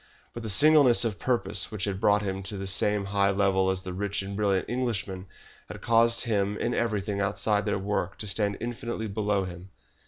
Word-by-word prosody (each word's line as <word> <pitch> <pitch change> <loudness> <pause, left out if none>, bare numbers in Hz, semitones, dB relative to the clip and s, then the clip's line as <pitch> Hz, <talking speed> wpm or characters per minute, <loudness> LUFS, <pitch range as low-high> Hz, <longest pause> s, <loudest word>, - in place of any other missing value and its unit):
But 120 - -7
the 110 - -4
singleness 130 +2 +5
of 105 -4 -3
purpose 105 -5 +1
which 105 -3 -4
had 100 -1 -2
brought 105 -1 +3
him 95 -1 -3
to 100 +1 -5
the 95 - -5
same 100 +1 +2
high 100 0 +1
level 95 -1 +1
as 95 0 -2
the 90 - -6
rich 100 +1 -2
and 100 +1 -6
brilliant 100 -3 0
Englishman, 100 -7 -3 0.4
had - - -9
caused 115 0 +3
him 105 -3 -1
in 120 - -2
everything 105 -3 -2
outside 105 +1 0
their 105 - 0
work 95 -1 -3
to - - -6
stand 100 0 -1
infinitely 120 -1 -5
below 105 -1 -1
him. 90 +1 -10
100 Hz, 195 wpm, -27 LUFS, 95-110 Hz, 0.4 s, singleness